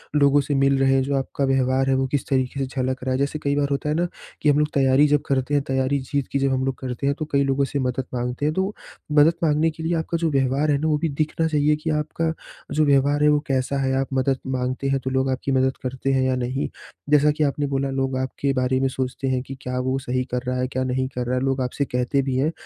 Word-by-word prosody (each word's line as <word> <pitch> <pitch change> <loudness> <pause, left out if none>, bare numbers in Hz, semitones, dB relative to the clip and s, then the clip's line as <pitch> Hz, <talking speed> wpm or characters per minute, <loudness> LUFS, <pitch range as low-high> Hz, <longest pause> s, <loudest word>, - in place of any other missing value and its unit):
लोगों 145 -1 +5
से 145 - -2
मिल 135 0 +3
रहे 135 0 +3
हैं, 135 - +3
जो 140 +1 -1
आपका 135 +1 -1
व्यवहार 135 0 +1
है - - +3
वो 135 0 +1
किस 140 0 -2
तरीक़े 130 0 0
से - - 0
झलक 130 0 -2
रहा 130 - -1
है। 130 - +1
जैसे 140 +2 -1
कई 140 0 +1
बार 145 -1 +1
होता 140 +1 -1
है 150 - +1
ना, 175 +2 +1 0.3
कि 150 - +3
हम 145 - +4
लोग 150 - +2
तैयारी 135 +1 +4
जब 145 0 +2
करते 135 +1 0
हैं, 145 -1 +2
तैयारी 135 +1 +1
जीत 140 -3 0
की 140 - 0
जब 135 0 +1
हम 130 0 0
लोग 135 -1 -1
करते 130 +1 -3
हैं 140 - +1
तो 155 - -2
कई 140 0 +3
लोगों 135 0 +1
से 140 +1 -3
मदद 130 0 -1
माँगते 125 +3 -2
हैं, 155 - +1
तो 190 +4 -1 0.4
मदद 150 +2 +5
माँगने 155 +1 +2
के 160 +1 -9
लिए 165 +2 0
आपका 160 +1 -2
जो 165 -1 0
व्यवहार 135 +2 +1
है 145 - +3
ना 155 +3 -1
वो 150 -1 +2
भी 165 +1 -1
दिखना 155 +3 -1
चाहिए 150 -1 +2
कि 165 - -1
आपका 155 +1 -1 0.4
जो 155 0 +3
व्यवहार 145 +1 +3
है 150 - +6
वो 150 0 +4
कैसा 135 +1 0
है, 135 0 0
आप 135 - -3
मदद 135 0 +1 0.2
माँगते 130 +2 -2
हैं 135 0 +1
तो 130 - -1
लोग 130 0 0
आपकी 130 +1 -2
मदद 130 0 +1
करते 130 +1 -2
हैं 130 -1 +2
या 130 - +1
नहीं? 130 +2 -2 0.4
जैसा 150 0 +5
कि 155 +1 -1
आपने 145 0 0
बोला 135 0 -1
लोग 135 -1 -1
आपके 130 +1 -1
बारे 130 0 +1
में 135 - +2
सोचते 130 +1 -3
हैं 130 -1 0
कि 135 +1 -8
क्या 125 0 -3
वो 130 +1 0
सही 130 -1 -1
कर 125 0 -2
रहा 125 - -1
है, 130 - 0
क्या 130 0 -2
नहीं 130 0 -1
कर 125 0 -2
रहा 125 - 0
है? - - -1
लोग 135 -1 0
आपसे 130 +3 -1
कहते 125 +3 0
भी 130 -1 -2
हैं। 150 +4 +1
135 Hz, 280 wpm, -23 LUFS, 130-145 Hz, 0.4 s, है